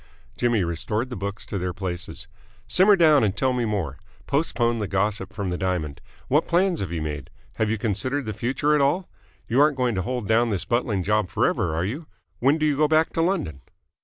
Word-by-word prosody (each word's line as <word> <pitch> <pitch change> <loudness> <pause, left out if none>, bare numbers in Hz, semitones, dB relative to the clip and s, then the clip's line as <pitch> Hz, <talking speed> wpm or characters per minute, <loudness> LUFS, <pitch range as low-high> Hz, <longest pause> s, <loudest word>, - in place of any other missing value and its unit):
Jimmy 120 -5 +1
restored 105 +9 -2
the - - -3
books 100 +1 -5
to 100 - -4
their 90 0 -2
places. 90 -1 -5 0.4
"Simmer 195 +3 +5
down 155 -7 +5
and 100 -2 0
tell 130 -1 +2
me 125 -2 0
more. 95 - -2 0.3
Postpone 120 -5 0
the 105 - -2
gossip 95 0 -1
from 100 -4 -3
the 90 - -3
diamond. 90 -6 -2 0.3
What 150 +4 +2
plans 180 0 +2
have 95 -4 -3
you 80 -2 -2
made? 75 -3 -5 0.3
Have 110 -1 +1
you 110 - 0
considered 115 +7 -1
the 110 - -3
future 135 +6 0
at 150 - +3
all? 170 +7 +1 0.4
You 125 +4 +3
aren't 150 -2 +4
going 125 -2 +1
to 95 - -1
hold 120 +2 -3
down 115 +2 +3
this 100 -5 -1
buttling 115 -5 0
job 105 -1 +1
forever, 80 - +1
are 85 +3 0
you? 145 - -5 0.3
When 140 +5 +3
do 155 - 0
you 150 -2 +2
go 150 0 +4
back 155 +1 +2
to 165 - +1
London?" 165 - -1
110 Hz, 215 wpm, -24 LUFS, 95-140 Hz, 0.4 s, Simmer